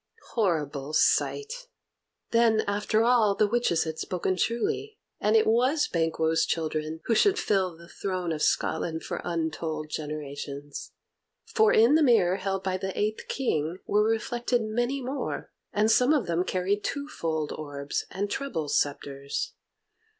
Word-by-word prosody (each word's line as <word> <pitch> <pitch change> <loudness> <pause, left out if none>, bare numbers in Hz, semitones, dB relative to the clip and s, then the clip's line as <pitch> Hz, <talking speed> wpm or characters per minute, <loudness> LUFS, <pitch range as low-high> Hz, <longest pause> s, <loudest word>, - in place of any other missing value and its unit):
Horrible 150 - -1
sight! 460 - +1 0.6
Then, 230 -2 +4
after 210 +2 +1
all, 230 -4 +4
the 215 - +3
witches 210 -6 +1
had 160 -1 -5
spoken 185 -1 -1
truly, 235 - -1 0.2
and 210 +1 +2
it 220 - +5
was 255 +7 +3
Banquo's 160 -1 +1
children 155 0 -2
who 230 - +2
should 400 - +4
fill 190 - 0
the 170 0 -14
throne 185 -2 -3
of 155 -2 -3
Scotland 160 +1 0
for - - -4
untold 160 -2 -3
generations. 145 -2 -6 0.5
For 440 -2 +3
in 230 +5 +5
the 315 - +5
mirror 220 - +4
held 195 -1 -2
by 185 -1 -1
the 190 0 -5
eighth 215 +1 -1
King 165 - -1
were 210 - +2
reflected 235 +2 0
many 240 +5 -1
more, 270 +3 -4 0.2
and 215 +1 +2
some 250 +6 +5
of 290 -6 +1
them 170 +1 0
carried 190 +3 0
twofold 165 - -3
orbs 145 -2 -4
and 200 +2 -2
treble 200 - -3
sceptres. 140 -1 -2
190 Hz, 145 wpm, -27 LUFS, 160-235 Hz, 0.6 s, it